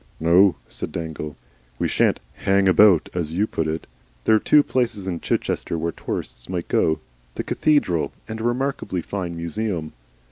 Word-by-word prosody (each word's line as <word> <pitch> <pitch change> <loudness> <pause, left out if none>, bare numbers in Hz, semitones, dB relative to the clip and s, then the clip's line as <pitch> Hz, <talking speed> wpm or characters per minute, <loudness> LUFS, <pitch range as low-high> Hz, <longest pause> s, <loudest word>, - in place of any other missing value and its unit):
"No," 90 +4 +5
said - - -5
Dangle, 80 -3 -5 0.4
"we - - 0
shan't - - +2
HANG 95 0 +2
ABOUT, 95 -1 +6
as 80 -3 -2
you 100 +5 +2
put 80 -7 -2
it. 80 +1 -3 0.4
There 110 - +4
are 110 - +6
two 150 +5 +5
places 120 -8 -1
in 90 -3 -3
Chichester 85 - -1
where 85 +1 -1
tourists - - -5
might 90 -2 -3
go 80 - +2 0.4
the - - -2
cathedral 145 - +1 0.2
and 110 0 -5
a - - -4
remarkably 120 -7 -1
fine 90 -3 -4
museum. 85 -1 -3
90 Hz, 165 wpm, -23 LUFS, 80-110 Hz, 0.4 s, ABOUT